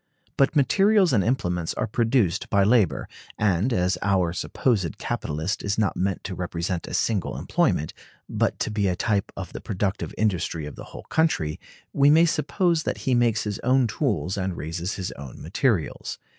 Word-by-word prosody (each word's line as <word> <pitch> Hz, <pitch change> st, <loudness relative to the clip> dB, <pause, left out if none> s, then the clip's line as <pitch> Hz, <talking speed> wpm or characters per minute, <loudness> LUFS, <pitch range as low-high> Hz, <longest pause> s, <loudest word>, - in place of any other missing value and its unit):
But 135 Hz, +3 st, +2 dB
materials 195 Hz, +5 st, +4 dB
and 105 Hz, -5 st, +3 dB
implements 90 Hz, -8 st, -1 dB
are -, -, -1 dB
produced 115 Hz, -4 st, +1 dB
by 100 Hz, -1 st, +3 dB
labor; 100 Hz, -, +2 dB, 0.3 s
and 105 Hz, +3 st, +1 dB
as 90 Hz, -4 st, +1 dB
our 95 Hz, -4 st, +1 dB
supposed 95 Hz, -, -1 dB
capitalist 80 Hz, +7 st, -3 dB
is 100 Hz, 0 st, -1 dB
not 105 Hz, -4 st, +1 dB
meant 95 Hz, 0 st, -1 dB
to 95 Hz, -, -5 dB
represent 90 Hz, 0 st, -3 dB
a -, -, -4 dB
single 105 Hz, -6 st, 0 dB
employment, 75 Hz, -, 0 dB, 0.3 s
but -, -, 0 dB
to -, -, -1 dB
be 105 Hz, -2 st, 0 dB
a 90 Hz, -, +1 dB
type 100 Hz, +1 st, 0 dB
of 95 Hz, -2 st, -6 dB
the -, -, -6 dB
productive 100 Hz, 0 st, -2 dB
industry 90 Hz, -6 st, -1 dB
of 75 Hz, -, -7 dB
the -, -, -9 dB
whole -, -, -10 dB
country, 80 Hz, -, 0 dB, 0.3 s
we 140 Hz, 0 st, +5 dB
may 160 Hz, +3 st, +6 dB
suppose 170 Hz, +2 st, +1 dB
that -, -, -2 dB
he 130 Hz, -, +2 dB
makes 120 Hz, -3 st, +2 dB
his 105 Hz, 0 st, -3 dB
own 130 Hz, +1 st, +3 dB
tools 105 Hz, -, -1 dB
and 95 Hz, -2 st, -2 dB
raises 85 Hz, +5 st, -4 dB
his 95 Hz, -2 st, -4 dB
own 70 Hz, -4 st, -9 dB
materials. 95 Hz, -, -1 dB
100 Hz, 175 wpm, -25 LUFS, 90-125 Hz, 0.3 s, may